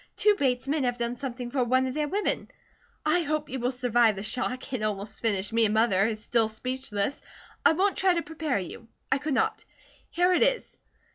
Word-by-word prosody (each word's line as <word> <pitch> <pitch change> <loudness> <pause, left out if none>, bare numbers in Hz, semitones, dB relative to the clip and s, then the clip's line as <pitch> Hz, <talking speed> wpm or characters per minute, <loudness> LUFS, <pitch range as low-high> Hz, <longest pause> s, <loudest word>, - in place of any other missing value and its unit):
Two 420 0 +5
Bates 260 -7 0
men 290 0 0
have 245 -1 0
done 235 0 -2
something 245 -2 -5
for 260 -1 +1
one 255 +2 +2
of 260 - -3
their 300 +1 -1
women. 405 +7 -1 0.6
I 310 +3 +4
hope 305 -1 -2
you 265 - -3
will 245 +1 0
survive 240 -3 +2
the 195 - -6
shock; 255 +4 -1
it 250 - -1
almost 210 0 -3
finished 205 -2 0
me 230 0 +4
and 210 0 +1
Mother 215 -3 +3
is 215 -1 -3
still 230 -2 +2
speechless. 225 0 -3 0.4
I - - +6
won't 390 +4 +1
try 375 -2 +3
to 335 - -1
prepare 315 -4 -2
you. 200 +5 -7 0.2
I 265 - +3
could 295 -1 -1
not. - - 0 0.5
Here 355 +2 +2
it 355 - +2
is. - - +1
255 Hz, 210 wpm, -27 LUFS, 225-300 Hz, 0.6 s, I